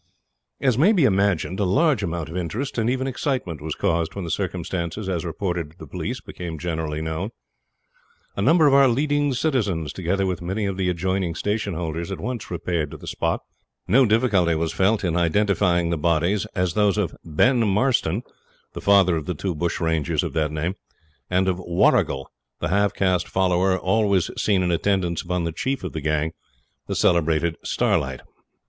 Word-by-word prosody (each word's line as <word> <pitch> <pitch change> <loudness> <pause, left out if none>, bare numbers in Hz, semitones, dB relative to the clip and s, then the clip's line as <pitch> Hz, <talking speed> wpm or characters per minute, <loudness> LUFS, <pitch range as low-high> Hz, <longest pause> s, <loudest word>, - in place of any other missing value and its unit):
As 130 -3 +2
may 190 +9 +5
be 180 -8 +3
imagined, 95 -4 +1
a - - +2
large 140 - +2
amount 85 -1 -3
of 80 - -8
interest, 110 +10 -3
and 115 +1 +1
even 130 +1 0
excitement, 130 - -2
was 80 0 -4
caused 85 0 0
when 100 - -4
the 85 - -4
circumstances, 90 +1 -3
as 90 -3 -1
reported 85 -2 -3
to 80 - -22
the - - -9
police, 100 +9 -4
became 85 -3 -7
generally 80 -2 -3
known. 80 +5 -3 1.1
A - - -2
number 165 -1 +5
of 140 - +5
our 140 -1 +7
leading 145 +3 +1
citizens, 105 - 0
together 95 +2 -1
with 90 -3 -2
many 95 +5 -2
of 100 -1 -2
the 95 -1 0
adjoining 90 0 -1
station 105 -2 -2
holders, 85 +1 -4
at 95 - -4
once 120 0 -4
repaired 85 -3 -2
to - - -9
the - - -12
spot. - - -1 0.5
No 125 +6 +5
difficulty 105 -7 +3
was 80 0 -1
felt 100 +3 +2
in 85 -3 0
identifying 85 -1 +2
the 85 - -1
bodies 85 +6 +1
as 90 -3 0
those 105 -1 +2
of 95 -6 -1
Ben 120 - +2
Marston, 105 -2 +1 0.5
the - - -6
father 100 -3 +5
of 80 - -5
the 90 - -2
two 95 +4 -2
bush 85 +2 -2
rangers 80 -4 0
of - - -4
that 80 -2 0
name, 80 +4 -2 0.6
and 95 +1 +2
of 90 -1 0
Warrigal, 85 -6 +2 0.3
the 80 - -2
half 100 +2 +2
caste 90 -2 +1
follower 95 0 +2
always 95 0 +1
seen 100 -3 +1
in 90 - +1
attendance 85 -1 0
upon 90 -1 -2
the 85 - -1
chief 135 +12 -2
of - - -5
the 80 - -4
gang, 75 +1 0 0.6
the - - -2
celebrated 85 -1 +2
Starlight. - - 0
90 Hz, 185 wpm, -23 LUFS, 85-105 Hz, 1.1 s, our